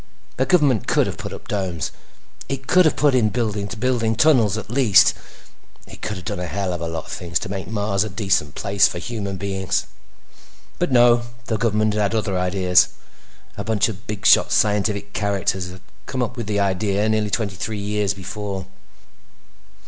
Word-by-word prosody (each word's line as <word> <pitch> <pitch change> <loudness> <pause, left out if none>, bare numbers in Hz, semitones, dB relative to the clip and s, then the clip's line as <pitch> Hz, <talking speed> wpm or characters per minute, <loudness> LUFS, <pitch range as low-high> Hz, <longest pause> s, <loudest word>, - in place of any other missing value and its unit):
The 130 - +1
government 140 - +3
could - - +3
have - - -5
put - - -6
up - - -10
domes; 95 -5 -2 0.6
it 135 -1 -4
could 180 +4 +5
have 155 - +3
put 145 -2 +3
in 120 -4 +3
building 105 -4 -2
to 110 - -7
building 115 -1 0
tunnels, 115 -8 +4
at 110 0 -7
least. 120 -6 +5 0.7
It - - -13
could 110 - -3
have 90 - -10
done - - -3
a 90 - -3
hell 95 +2 -2
of 85 - -5
a 85 - -2
lot 80 -2 -5
of - - -10
things 85 -1 -2
to 105 - -4
make 95 -2 -5
Mars 100 -1 0
a 110 - -5
decent 95 -7 0
place 100 -1 +3
for - - -5
human 100 0 -4
beings. 95 -1 -2 0.9
But 175 - 0
no—the 120 -1 +2
government 110 -1 +1
had 105 +1 0
other 105 -3 -1
ideas. 90 0 +3 0.7
A 100 - -3
bunch 110 0 +1
of 100 -1 -9
bigshot 105 -1 +4
scientific 105 -1 +1
characters 100 -3 -1
had 95 +1 -11 0.3
come 130 -2 -1
up 120 - -4
with 120 -4 -5
the 105 -1 0
idea 100 +1 +1
nearly 110 -1 +1
twenty 100 -2 -2
three 110 +4 -4
years 100 -1 -1
before. 100 0 -5
105 Hz, 185 wpm, -21 LUFS, 95-115 Hz, 0.9 s, could